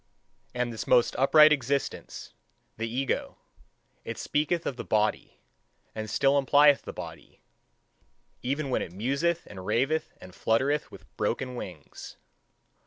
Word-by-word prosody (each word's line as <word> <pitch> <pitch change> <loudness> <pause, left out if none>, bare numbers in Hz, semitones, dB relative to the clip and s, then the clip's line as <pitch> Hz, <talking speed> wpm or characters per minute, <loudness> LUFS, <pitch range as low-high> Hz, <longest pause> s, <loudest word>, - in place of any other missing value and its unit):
And 120 -1 -1
this 110 - -6
most 120 - +4
upright 150 +3 +7
existence, 140 -1 -3 0.4
the 115 +1 -3
ego 130 +3 -2 0.7
it - - -6
speaketh 160 +3 -1
of 135 - -2
the - - -6
body, 105 0 0 0.6
and 110 0 -5
still 140 +5 +3
implieth 145 +1 +5
the - - -7
body, - - -10 1.0
even 140 +2 -2
when - - +1
it - - -5
museth 140 - -1
and 95 -2 -10
raveth 135 +10 0
and 90 0 -12
fluttereth 135 +10 0
with - - -13
broken 125 -1 -2
wings. 90 -10 -9
130 Hz, 130 wpm, -28 LUFS, 110-145 Hz, 1.0 s, upright